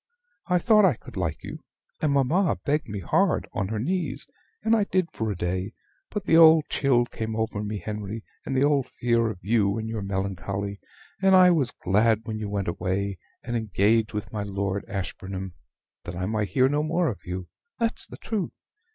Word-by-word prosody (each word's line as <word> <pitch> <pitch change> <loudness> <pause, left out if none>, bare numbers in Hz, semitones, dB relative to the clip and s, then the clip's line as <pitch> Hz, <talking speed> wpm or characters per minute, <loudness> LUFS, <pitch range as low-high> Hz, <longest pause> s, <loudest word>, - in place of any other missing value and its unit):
I 180 -1 +3
thought 215 +3 +5
I 180 -9 +5
could - - -14
like 85 -4 -2
you; - - -7 0.4
and 155 - +2
mamma 145 +7 +2
begged 150 -3 0
me 100 -1 -4
hard, 190 - +2
on 105 -6 -1
her 110 +2 -3
knees, 140 - -1 0.4
and 225 +1 +4
I 210 -3 +2
did 185 -3 0
for 110 - -2
a 105 - -1
day. 90 +4 -2 0.4
But 210 -2 -4
the 165 - +5
old 160 -1 +8
chill 125 -4 +3
came 110 -2 -4
over 110 -2 -2
me, 105 0 -3
Henry, 105 +1 -5 0.2
and 135 - -2
the 130 - +4
old 145 -3 +2
fear 115 -1 +1
of 110 - -5
you 100 -1 +2
and 110 0 -3
your 110 -1 -3
melancholy; 100 +1 -3 0.4
and 190 -1 +6
I 180 -1 +8
was 145 -7 +2
glad 110 +2 +2
when 110 -2 -4
you 105 -1 -4
went 100 -1 -2
away, 95 +3 -2 0.2
and 120 0 -3
engaged 110 0 +2
with 105 +1 -5
my 105 - -2
Lord 100 -1 -2
Ashburnham, 95 -1 -5 0.5
that 85 - -6
I 90 +1 -2
might 105 0 -1
hear 130 +7 +4
no 145 +2 +1
more 165 +3 +1
of 110 - -3
you, 90 0 -5 0.3
that's 230 -2 0
the - - -10
truth. 215 -5 -3
110 Hz, 195 wpm, -26 LUFS, 100-150 Hz, 0.5 s, old